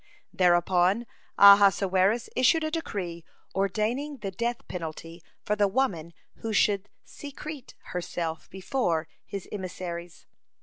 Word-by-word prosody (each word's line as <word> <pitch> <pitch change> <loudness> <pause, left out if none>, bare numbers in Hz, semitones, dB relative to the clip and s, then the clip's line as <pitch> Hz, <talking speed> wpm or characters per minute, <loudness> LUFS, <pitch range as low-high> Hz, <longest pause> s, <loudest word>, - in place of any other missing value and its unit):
Thereupon 180 +4 +3 0.3
Ahasuerus 200 +1 +6
issued 315 +6 +4
a 310 - -2
decree 185 - -4 0.3
ordaining 220 +9 -1
the 200 -5 -5
death 235 +5 -3
penalty 165 -1 -7 0.2
for 210 - 0
the 205 -1 +3
woman 185 -8 -1 0.2
who 225 -1 -4
should 205 -1 +2
secrete 290 -1 -9 0.2
herself 170 -2 -4
before 180 -5 -1 0.2
his 200 -2 -6
emissaries. 175 -3 -6
195 Hz, 105 wpm, -27 LUFS, 175-235 Hz, 0.3 s, Ahasuerus